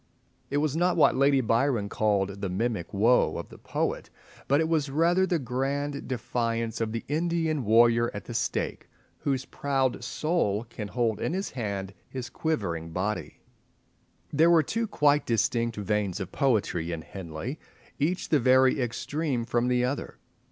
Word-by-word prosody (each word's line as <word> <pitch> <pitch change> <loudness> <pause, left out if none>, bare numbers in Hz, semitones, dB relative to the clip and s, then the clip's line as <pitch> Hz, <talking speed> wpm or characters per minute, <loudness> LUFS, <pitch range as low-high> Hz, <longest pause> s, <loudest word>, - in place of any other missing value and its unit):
It 145 - 0
was 150 -1 +1
not 175 +2 +2
what 155 - +5
Lady 140 0 +4
Byron 115 -1 +1
called 100 -2 0
"the 100 - -2
mimic 105 -1 -2
woe" 115 +5 +3
of - - -6
the - - -13
poet, - - -2 0.4
but 140 +2 +3
it 160 - +2
was 155 -3 +1
rather 170 +6 +3
the 180 - +1
grand 140 +2 -2
defiance 115 -2 -2
of 110 -1 -1
the 115 0 -4
Indian 160 -1 0
warrior 115 +2 +4
at 100 -1 -7
the 120 - -7
stake, 115 - -2 0.3
whose 135 -2 -1
proud 135 -3 -1
soul 120 - 0
can 110 -2 -7
hold 115 -1 0
in - - -1
hand 100 - -4 0.2
his 130 -2 -6
quivering 90 - -2
body. 95 +4 -3 0.9
There 160 +3 +5
were 165 -2 +6
two 225 +9 -2
quite 150 -7 +2
distinct 115 0 +1
veins 105 -2 -1
of 95 -2 -5
poetry 105 - 0
in 80 -2 -4
Henley, 95 - -6 0.4
each 170 +6 0
the 150 - +4
very 130 +1 +4
extreme 125 +1 -2
from 120 +1 +1
the 125 0 +2
other. 135 +3 -4
125 Hz, 160 wpm, -27 LUFS, 105-145 Hz, 0.9 s, were